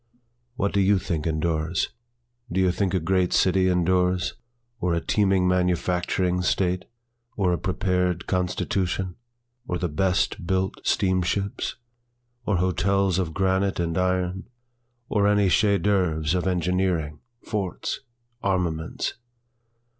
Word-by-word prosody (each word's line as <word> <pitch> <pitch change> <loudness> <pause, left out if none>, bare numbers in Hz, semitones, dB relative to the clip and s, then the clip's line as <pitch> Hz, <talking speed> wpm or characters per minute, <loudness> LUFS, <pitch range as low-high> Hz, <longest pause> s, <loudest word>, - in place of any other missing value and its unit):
What 100 -5 -1
do 100 - +2
you 100 +1 +4
think 85 -3 -2
endures? 80 +1 0 0.6
Do 95 - 0
you 95 -1 +4
think 95 +1 0
a - - +2
great 90 +2 +1
city 95 0 +3
endures? 90 0 +2 0.5
Or 85 -1 +1
a - - +1
teeming 95 0 +2
manufacturing 90 0 +1
state? 90 0 0 0.5
or 95 -3 +2
a - - +1
prepared 90 -1 0
constitution? 90 0 -1 0.5
or 90 - -1
the 90 - -1
best 90 +2 0
built 95 +1 -1
steamships? 95 +1 0 0.7
Or 100 - +2
hotels 95 +1 +1
of 80 -4 -2
granite 95 0 +1
and 85 -1 -1
iron? 90 +1 -1 0.6
or 100 -1 +2
any 105 -2 +3
chef 100 -1 +3
dâÅuvres 85 -6 +1
of 90 0 0
engineering, 90 -3 0 0.2
forts, 100 -4 -3 0.4
armaments? 90 -5 -1
90 Hz, 120 wpm, -25 LUFS, 90-95 Hz, 0.7 s, you